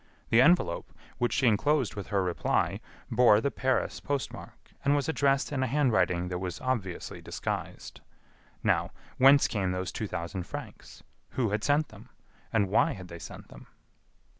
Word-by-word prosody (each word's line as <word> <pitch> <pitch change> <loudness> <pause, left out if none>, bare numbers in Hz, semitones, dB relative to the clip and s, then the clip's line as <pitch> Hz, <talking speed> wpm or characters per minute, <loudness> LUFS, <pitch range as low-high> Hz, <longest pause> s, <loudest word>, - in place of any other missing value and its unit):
The 115 +1 +6
envelope, 150 - +3 0.3
which 120 - +1
she 130 - +1
enclosed 125 +3 +2
with 100 - -6
her 100 -2 +1
reply, 90 -2 0 0.3
bore 120 -4 +6
the 140 +5 -1
Paris 130 0 -1
post 140 -2 -3
mark, - - -12
and 140 +1 +3
was 140 -2 0
addressed 140 -3 +1
in 135 -3 -1
a 130 - +1
handwriting 115 -10 +1
that 90 0 -3
was 90 -1 -4
obviously 110 -9 -3
disguised. - - -5 0.6
Now, - - +2 0.3
whence 135 +2 +7
came 95 -5 -1
those 90 0 -3
two 110 - -4
thousand 85 0 -5
francs? - - -9 0.3
Who 120 -6 +1
had 105 0 -1
sent 145 +2 +2
them? 110 +4 -14 0.4
And 105 -4 +2
why 100 - +3
had 90 -2 -10
they 85 - -8
sent - - -10
them? - - -13
115 Hz, 165 wpm, -29 LUFS, 95-135 Hz, 0.6 s, whence